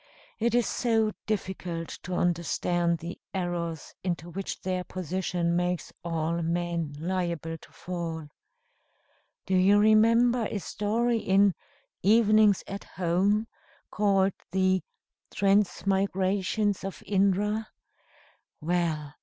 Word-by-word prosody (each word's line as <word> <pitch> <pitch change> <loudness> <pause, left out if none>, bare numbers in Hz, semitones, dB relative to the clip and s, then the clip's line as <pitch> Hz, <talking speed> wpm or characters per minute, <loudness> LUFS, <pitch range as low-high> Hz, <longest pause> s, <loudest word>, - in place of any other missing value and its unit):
It 235 +1 +1
is 240 -2 +3
so 225 -3 +1 0.2
difficult 180 -5 -3
to 180 0 -4
understand 175 0 +1
the 170 +2 -7 0.2
errors 175 -3 -3
into 175 -2 -3
which 195 +2 -5
their 185 -1 -2
position 180 -1 -2
makes 175 -1 -1
all 165 0 -1
men 170 -2 -2
liable 170 -1 -2
to - - -17
fall. 165 -3 -5 1.2
Do 190 - 0
you 190 +3 +5
remember 230 +3 +4
a - - -2
story 225 +4 0
in 195 -1 +4 0.5
'Evenings 215 -1 +5
at 195 +1 -6
Home,' 190 +5 +1 0.5
called 195 -2 +2 0.2
the 185 0 +2 0.5
Transmigrations 195 0 +1
of 195 0 -6
Indra? 205 +2 +1 0.9
Well! 160 -3 -1
185 Hz, 105 wpm, -28 LUFS, 170-205 Hz, 1.2 s, you